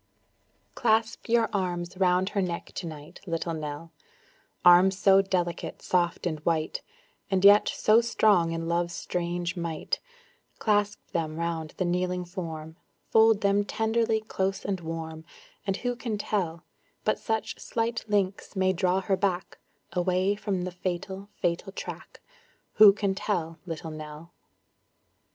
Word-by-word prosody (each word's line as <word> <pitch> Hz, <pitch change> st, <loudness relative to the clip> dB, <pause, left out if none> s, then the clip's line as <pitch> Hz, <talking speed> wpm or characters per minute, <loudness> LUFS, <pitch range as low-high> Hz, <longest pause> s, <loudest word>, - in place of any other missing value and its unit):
Clasp 225 Hz, -1 st, +1 dB
your 230 Hz, -1 st, +4 dB
arms 180 Hz, -2 st, -2 dB
round 185 Hz, 0 st, +2 dB
her 200 Hz, -, 0 dB
neck 175 Hz, -2 st, -3 dB
to 175 Hz, -, -5 dB
night, 150 Hz, -2 st, -10 dB
Little 165 Hz, 0 st, -2 dB
Nell, 155 Hz, +1 st, -6 dB, 0.7 s
Arms 180 Hz, +2 st, +7 dB
so 195 Hz, -1 st, +6 dB
delicate, 175 Hz, -3 st, -2 dB
soft 175 Hz, -1 st, 0 dB
and 160 Hz, -3 st, -1 dB
white, 160 Hz, 0 st, -1 dB, 0.5 s
And 190 Hz, 0 st, +2 dB
yet 205 Hz, +1 st, +8 dB
so 220 Hz, +2 st, +4 dB
strong 210 Hz, -7 st, +3 dB
in 165 Hz, 0 st, -3 dB
love's 170 Hz, 0 st, 0 dB
strange 175 Hz, 0 st, -2 dB
might; 170 Hz, -, -3 dB, 0.6 s
Clasp 205 Hz, -1 st, +1 dB
them 160 Hz, -2 st, -2 dB
around 165 Hz, -2 st, -3 dB
the 185 Hz, -, 0 dB
kneeling 180 Hz, 0 st, -1 dB
form, 165 Hz, -3 st, -6 dB, 0.3 s
Fold 220 Hz, -1 st, +5 dB
them 200 Hz, 0 st, +3 dB
tenderly 220 Hz, +1 st, 0 dB
close 195 Hz, -2 st, -2 dB
and 195 Hz, -2 st, -1 dB
warm, 160 Hz, -1 st, -6 dB, 0.4 s
And 195 Hz, 0 st, 0 dB
who 245 Hz, 0 st, -2 dB
can 230 Hz, -3 st, -3 dB
tell 175 Hz, -5 st, -2 dB, 0.4 s
But -, -, +1 dB
such 220 Hz, -1 st, -2 dB
slight 230 Hz, 0 st, -2 dB
links 200 Hz, -1 st, -1 dB
may 190 Hz, 0 st, +2 dB
draw 185 Hz, +1 st, +1 dB
her 195 Hz, +1 st, +1 dB
back, 185 Hz, -1 st, -2 dB, 0.3 s
Away 185 Hz, +2 st, +2 dB
from 200 Hz, -3 st, -2 dB
the 185 Hz, -, -3 dB
fatal, 190 Hz, +2 st, -4 dB
fatal 175 Hz, +3 st, -1 dB
track; -, -, -8 dB, 0.6 s
Who 210 Hz, -1 st, +10 dB
can 200 Hz, -1 st, -1 dB
tell, 170 Hz, -5 st, -2 dB
Little 165 Hz, -1 st, -5 dB
Nell? 155 Hz, +2 st, -9 dB
185 Hz, 140 wpm, -27 LUFS, 170-205 Hz, 0.7 s, Who